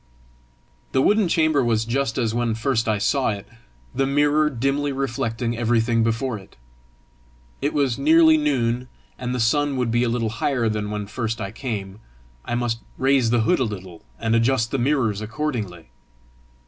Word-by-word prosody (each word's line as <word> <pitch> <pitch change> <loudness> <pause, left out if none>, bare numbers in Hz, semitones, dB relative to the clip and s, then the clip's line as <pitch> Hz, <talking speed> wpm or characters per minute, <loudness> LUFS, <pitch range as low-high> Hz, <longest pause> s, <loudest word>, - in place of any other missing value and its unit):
The 130 - +3
wooden 210 -2 +3
chamber 155 -4 +2
was 115 -2 +1
just 120 0 -1
as 115 -4 0
when 120 -1 0
first 115 -1 0
I 105 - +2
saw 130 +6 +1
it, 100 -1 -4 0.5
the 135 - +1
mirror 145 +2 +3
dimly 135 +2 -1
reflecting 120 -3 -2
everything 115 0 +1
before 115 +1 -1
it. 95 - -18 1.0
It 145 - 0
was 140 -5 0
nearly 320 +1 +6
noon, 125 - 0 0.3
and 125 0 -3
the - - -2
sun 140 +4 +1
would 125 -2 0
be 120 +1 +2
a 120 - +1
little 115 -1 0
higher 120 +1 0
than 105 -1 -2
when 105 -1 -3
first 115 +1 -3
I 100 - -4
came: 105 -5 -5 0.4
I 120 - -3
must 120 -1 -1 0.2
raise 130 -3 +3
the 120 0 +2
hood 110 - +2
a - - +2
little, 95 -6 -7 0.2
and 115 0 0
adjust 115 0 +2
the 135 - 0
mirrors 120 -6 +1
accordingly! 110 - -4
120 Hz, 170 wpm, -23 LUFS, 110-135 Hz, 1.0 s, nearly